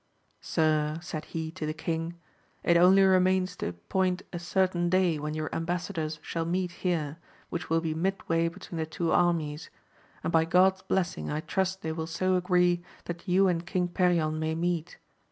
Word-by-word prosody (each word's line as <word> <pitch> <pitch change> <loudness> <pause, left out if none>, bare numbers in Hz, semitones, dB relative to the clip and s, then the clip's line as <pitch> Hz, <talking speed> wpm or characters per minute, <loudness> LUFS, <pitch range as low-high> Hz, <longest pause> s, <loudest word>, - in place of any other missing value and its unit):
Sir, 155 -1 +1
said 160 -3 -6
he 160 -1 -4
to 160 -3 -5
the 155 - -3
king, 165 +1 -3 0.5
it 170 - +4
only 185 +3 +7
remains 185 0 +3
to - - -3
appoint 180 - -1
a 175 - -3
certain 175 0 +1
day 180 -4 +2
when 150 +1 -3
your 155 0 -3
ambassadors 165 -2 -2
shall 165 - -2
meet 180 +2 -1
here, 165 -5 -2 0.3
which 170 - -4
will 165 0 +2
be 160 -1 -1
mid 190 +5 -2
way 165 0 +2
between 170 0 -7
the 160 - -1
two 165 +1 -2
armies; 160 -3 +1 0.5
and - - -2
by 160 -1 +5
God*s 185 +3 +4
blessing 185 -1 -1
I 150 +1 -2
trust 190 +2 -1
they 160 - -2
will 160 0 -4
so 185 +3 0
agree 180 -1 +2 0.2
that 175 +2 -6
you 190 +2 +4
and 170 -2 0
king 180 0 -1
Perion 170 -3 +1
may 160 0 -1
meet. 170 0 -2
170 Hz, 180 wpm, -28 LUFS, 160-185 Hz, 0.5 s, only